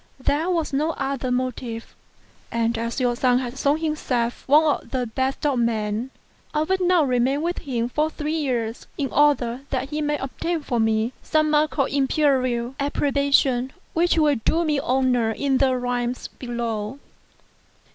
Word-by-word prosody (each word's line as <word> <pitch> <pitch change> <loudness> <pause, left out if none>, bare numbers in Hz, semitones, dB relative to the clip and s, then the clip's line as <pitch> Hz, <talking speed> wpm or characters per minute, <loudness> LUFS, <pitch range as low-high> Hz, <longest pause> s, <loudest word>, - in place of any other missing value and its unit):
There 295 +6 0
was 330 -5 -1
no 305 +4 +1
other 270 -2 -2
motive; 250 -2 -3 0.6
and, 230 0 0
as 230 +3 -3
your 245 -1 +1
son 250 0 +3
has 255 +1 -4
shewn 285 +2 +3
him 315 -1 -1
self 240 -5 -2
one 295 +3 +6 0.2
of - - -18
the 255 -2 -1
best 260 +5 -2
of 275 -4 +2
men, 225 0 -1 0.5
I 300 - +3
would 375 +3 0
now 360 -2 +4
remain 265 +2 +1
with 345 +1 -1
him 245 -6 -2
for 300 +5 0
three 305 0 -3
years 245 -7 -2
in 275 -2 -1
order 270 -4 +2
that 265 0 -2
he 305 +1 -2
may 295 0 0
obtain 325 +5 -3
for 245 -4 -1
me 220 +2 +1
some 310 -1 +1
mark 305 +1 +2
of 275 - +2
Imperial 265 -3 +1
approbation 280 -2 +2
4 - - -30 0.2
which 340 +1 +2
will 300 -3 +3
do 335 +1 +2
me 300 -2 +1
honour 250 -4 +1
in 270 +2 0
the 260 -2 +3
realms 245 0 -2
below." 235 -1 -4
265 Hz, 170 wpm, -23 LUFS, 240-295 Hz, 0.6 s, one